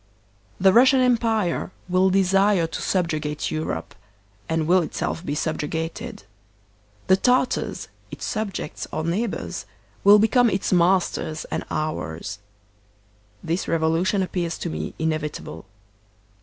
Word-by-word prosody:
The 190 Hz, 0 st, +5 dB
Russian 260 Hz, +3 st, +6 dB
Empire 225 Hz, -7 st, +1 dB, 0.2 s
will 185 Hz, +1 st, +3 dB
desire 195 Hz, -1 st, +3 dB
to 165 Hz, -, -5 dB
subjugate 155 Hz, -5 st, -1 dB
Europe, 155 Hz, -, -3 dB, 0.6 s
and 160 Hz, -1 st, 0 dB
will 180 Hz, +3 st, +4 dB
itself 165 Hz, +1 st, -3 dB
be 145 Hz, -, -3 dB
subjugated. 160 Hz, -3 st, -3 dB, 0.8 s
The 190 Hz, -, +5 dB
Tartars, 250 Hz, +4 st, +1 dB, 0.2 s
its -, -, -7 dB
subjects 205 Hz, -8 st, -4 dB
or 155 Hz, -, -2 dB
neighbors, 195 Hz, +7 st, -3 dB, 0.4 s
will 205 Hz, +1 st, +8 dB
become 235 Hz, +3 st, +4 dB
its 190 Hz, -1 st, -1 dB
masters 175 Hz, -3 st, +1 dB
and -, -, -2 dB
ours. 110 Hz, -, -4 dB, 1.0 s
This 170 Hz, +3 st, -2 dB
rev 165 Hz, -, 0 dB
olution 180 Hz, +5 st, +2 dB
appears 175 Hz, -2 st, -2 dB
to 170 Hz, -, -4 dB
me -, -, -5 dB
inevitable. 155 Hz, -, -3 dB
175 Hz, 115 wpm, -23 LUFS, 160-195 Hz, 1.0 s, will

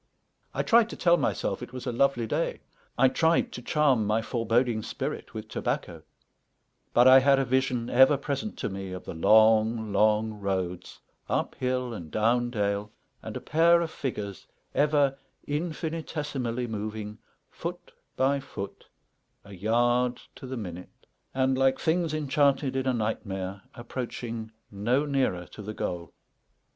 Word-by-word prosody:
I -, -, -1 dB
tried 230 Hz, -1 st, +4 dB
to -, -, -6 dB
tell 170 Hz, -1 st, +4 dB
myself 145 Hz, -5 st, -1 dB
it 125 Hz, 0 st, -8 dB
was 125 Hz, -1 st, -6 dB
a 125 Hz, -, -1 dB
lovely 120 Hz, -1 st, +2 dB
day; -, -, -2 dB, 0.4 s
I 130 Hz, +2 st, +6 dB
tried 160 Hz, +5 st, +2 dB
to 125 Hz, -, -7 dB
charm 130 Hz, -5 st, +2 dB
my 110 Hz, +1 st, +1 dB
foreboding 115 Hz, 0 st, +1 dB
spirit -, -, -5 dB
with -, -, -6 dB
tobacco; -, -, -3 dB, 0.9 s
but 120 Hz, +1 st, +5 dB
I 130 Hz, +1 st, +9 dB
had 135 Hz, +1 st, +4 dB
a 135 Hz, -, +1 dB
vision 125 Hz, -2 st, 0 dB
ever 130 Hz, +4 st, +6 dB
present 140 Hz, +9 st, -4 dB
to -, -, -2 dB
me 95 Hz, -1 st, -6 dB
of 90 Hz, -, -7 dB
the -, -, -6 dB
long, 110 Hz, +3 st, +4 dB
long 110 Hz, +2 st, +3 dB
roads, 95 Hz, -3 st, -3 dB, 0.3 s
up -, -, 0 dB
hill 125 Hz, -1 st, -2 dB
and 85 Hz, -7 st, -7 dB
down 120 Hz, +4 st, +1 dB
dale, 105 Hz, -2 st, -1 dB, 0.3 s
and -, -, -6 dB
a -, -, -7 dB
pair 170 Hz, +3 st, +4 dB
of 165 Hz, -2 st, -3 dB
figures 100 Hz, -7 st, -5 dB, 0.3 s
ever 145 Hz, -2 st, +2 dB, 0.3 s
infinitesimally 150 Hz, -5 st, -3 dB
moving, 105 Hz, -1 st, -5 dB, 0.3 s
foot -, -, -6 dB, 0.2 s
by 135 Hz, +2 st, +2 dB
foot, 100 Hz, -8 st, -8 dB, 0.6 s
a 100 Hz, -, -12 dB
yard 120 Hz, +5 st, +1 dB
to 130 Hz, -, -10 dB
the 130 Hz, 0 st, -5 dB
minute, 90 Hz, -5 st, -8 dB, 0.3 s
and, 130 Hz, 0 st, +1 dB
like 135 Hz, 0 st, +3 dB
things 165 Hz, 0 st, +1 dB
enchanted 140 Hz, -2 st, +1 dB
in 130 Hz, 0 st, -1 dB
a 130 Hz, -, +2 dB
nightmare, 100 Hz, -3 st, -3 dB
approaching 120 Hz, -2 st, -5 dB, 0.2 s
no 120 Hz, +8 st, +1 dB
nearer 130 Hz, -11 st, 0 dB
to -, -, -9 dB
the 105 Hz, +1 st, -6 dB
goal. 85 Hz, -4 st, -4 dB
120 Hz, 150 wpm, -27 LUFS, 105-135 Hz, 0.9 s, I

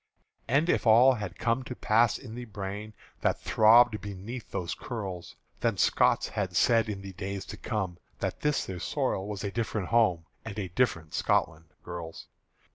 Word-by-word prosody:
And 140 Hz, +7 st, +2 dB
if -, -, +1 dB
all 120 Hz, +4 st, +7 dB
had 105 Hz, -6 st, -5 dB
come 115 Hz, +2 st, +1 dB
to 125 Hz, 0 st, -7 dB
pass 115 Hz, 0 st, +3 dB
in 120 Hz, -5 st, -10 dB
the 120 Hz, +1 st, -6 dB
brain 105 Hz, 0 st, -6 dB, 0.3 s
That -, -, +1 dB
throbbed 110 Hz, 0 st, +5 dB
beneath 105 Hz, +4 st, -7 dB
those 85 Hz, -2 st, -3 dB
curls, 95 Hz, -8 st, -6 dB, 0.2 s
Then -, -, 0 dB
Scots -, -, +3 dB
had -, -, -3 dB
said 115 Hz, -2 st, +4 dB
in 100 Hz, -2 st, -5 dB
the 95 Hz, -1 st, -8 dB
days 95 Hz, +2 st, -5 dB
to -, -, -8 dB
come 95 Hz, -6 st, -3 dB, 0.2 s
That -, -, -3 dB
this 150 Hz, -1 st, +1 dB
their 95 Hz, -2 st, -6 dB
soil 95 Hz, +3 st, -1 dB
was 105 Hz, -1 st, -5 dB
a 100 Hz, -, -2 dB
different 110 Hz, -4 st, -2 dB
home 95 Hz, -8 st, +3 dB, 0.2 s
And 110 Hz, -2 st, -7 dB
a 95 Hz, -3 st, -3 dB
different 85 Hz, -7 st, 0 dB
Scotland, 80 Hz, +1 st, 0 dB, 0.2 s
girls! 85 Hz, -2 st, -7 dB
105 Hz, 175 wpm, -29 LUFS, 95-115 Hz, 0.3 s, all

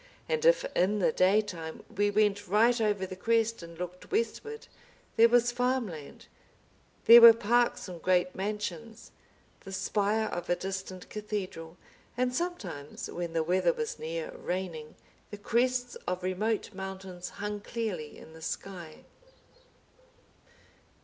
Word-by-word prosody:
And 475 Hz, -1 st, -1 dB
if -, -, +5 dB
in 195 Hz, +4 st, +2 dB
the 195 Hz, -, +2 dB
daytime 185 Hz, -4 st, 0 dB
we 205 Hz, +1 st, +2 dB
went 205 Hz, -1 st, +1 dB
right 230 Hz, +5 st, +3 dB
over 205 Hz, -3 st, +1 dB
the 185 Hz, -, -7 dB
crest 230 Hz, +2 st, +1 dB
and 170 Hz, 0 st, -11 dB
looked 180 Hz, +1 st, -7 dB
westward 445 Hz, +1 st, -2 dB, 0.5 s
there 230 Hz, +1 st, +6 dB
was 240 Hz, 0 st, +4 dB
farmland, 240 Hz, -, -2 dB, 0.8 s
there 235 Hz, +1 st, +10 dB
were 230 Hz, 0 st, +12 dB
parks 235 Hz, +1 st, +1 dB
and 175 Hz, -3 st, -8 dB
great 180 Hz, 0 st, +2 dB
mansions, 210 Hz, +3 st, -5 dB, 0.5 s
the 195 Hz, -, -11 dB
spire 210 Hz, +3 st, 0 dB
of 175 Hz, -, -5 dB
a 175 Hz, -, +3 dB
distant 190 Hz, 0 st, -6 dB
cathedral, 190 Hz, -6 st, -5 dB, 0.4 s
and 250 Hz, 0 st, +1 dB
sometimes 220 Hz, -, -4 dB
when 170 Hz, -1 st, -4 dB
the 165 Hz, -1 st, +1 dB
weather 185 Hz, -, +2 dB
was 460 Hz, -2 st, -4 dB
near -, -, -4 dB
raining, 175 Hz, -, -5 dB, 0.3 s
the 205 Hz, -, -7 dB
crests 245 Hz, +3 st, 0 dB
of 180 Hz, 0 st, -2 dB
remote 210 Hz, +4 st, -1 dB
mountains 190 Hz, -2 st, -7 dB
hung 205 Hz, 0 st, -3 dB
clearly 205 Hz, -8 st, -4 dB
in 160 Hz, -, -13 dB
the 160 Hz, -, -13 dB
sky. 170 Hz, -1 st, -7 dB
205 Hz, 135 wpm, -29 LUFS, 180-235 Hz, 0.8 s, were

